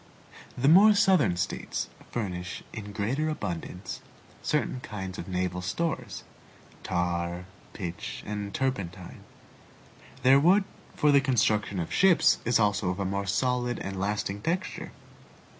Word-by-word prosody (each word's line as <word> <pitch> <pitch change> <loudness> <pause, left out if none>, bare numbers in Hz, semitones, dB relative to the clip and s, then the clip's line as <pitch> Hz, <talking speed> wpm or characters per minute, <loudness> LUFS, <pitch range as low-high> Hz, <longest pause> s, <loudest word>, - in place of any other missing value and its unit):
The 130 +2 +1
more 200 +7 +8
southern 185 - +4
States 95 +1 -2 0.2
furnish 90 -6 -4
in 105 -2 -7
greater 125 +10 -1
abundance 90 - -5 0.4
certain 150 -4 0
kinds 95 -6 -6
of - - -6
naval 90 -1 -2
stores 125 - -3 0.6
tar, 85 0 -2 0.3
pitch, 90 -4 -6
and 105 -1 -4
turpentine. 100 -9 -3 1.0
Their 135 +2 +7
wood 185 +7 +5 0.3
for 150 - +4
the 140 -1 +6
construction 110 -7 +1
of 85 - -3
ships 185 -2 +5
is 120 0 +3
also 105 -3 +2
of 90 +2 -3
a 100 - -1
more 100 +1 -2
solid 125 +3 0
and 95 -1 -5
lasting 100 0 -2
texture. 175 - -3
105 Hz, 125 wpm, -28 LUFS, 90-135 Hz, 1.0 s, more